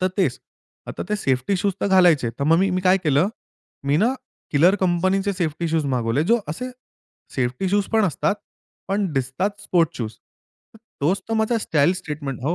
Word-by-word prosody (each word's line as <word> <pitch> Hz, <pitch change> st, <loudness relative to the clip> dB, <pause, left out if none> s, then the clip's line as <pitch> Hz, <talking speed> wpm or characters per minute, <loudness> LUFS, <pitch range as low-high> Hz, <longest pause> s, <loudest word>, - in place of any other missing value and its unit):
तर 185 Hz, -, +2 dB
तेच. 160 Hz, -10 st, +1 dB, 0.5 s
आता -, -, -5 dB
ते 210 Hz, -, 0 dB
सेफ्टी 135 Hz, +9 st, +1 dB
शूज 200 Hz, -, +2 dB
तर -, -, +1 dB
घालायचे, 160 Hz, -10 st, +5 dB
तर 140 Hz, -, -1 dB
मग 165 Hz, -, +6 dB, 0.2 s
मी -, -, 0 dB
काय 185 Hz, +1 st, +5 dB
केलं 150 Hz, +6 st, +3 dB, 0.6 s
मी 140 Hz, -, +3 dB
ना, 245 Hz, -, +2 dB, 0.4 s
किलर 165 Hz, +6 st, +5 dB
कंपनीचे 190 Hz, +3 st, +1 dB
सेफ्टी 165 Hz, 0 st, -1 dB
शूज 160 Hz, -2 st, +1 dB
मागवले. 120 Hz, +3 st, +1 dB
जो 235 Hz, -, +5 dB
असे 250 Hz, +10 st, -5 dB, 0.6 s
सेफ्टी 130 Hz, +8 st, -1 dB
शूज 205 Hz, -1 st, +2 dB
पण 220 Hz, -1 st, +4 dB
असतात. 190 Hz, +3 st, 0 dB, 0.5 s
पण 200 Hz, +1 st, +1 dB
दिसतात 180 Hz, +11 st, -1 dB
स्पोर्ट्स 170 Hz, -4 st, +1 dB
शूज. 110 Hz, -2 st, -4 dB, 0.8 s
तोच 170 Hz, +8 st, +1 dB
तर 225 Hz, -, 0 dB
माझा 225 Hz, +2 st, +1 dB
स्टाईल 155 Hz, +3 st, +3 dB
स्टेटमेंट 145 Hz, -5 st, -5 dB
हो. 160 Hz, +5 st, +1 dB
170 Hz, 170 wpm, -22 LUFS, 140-195 Hz, 0.8 s, मग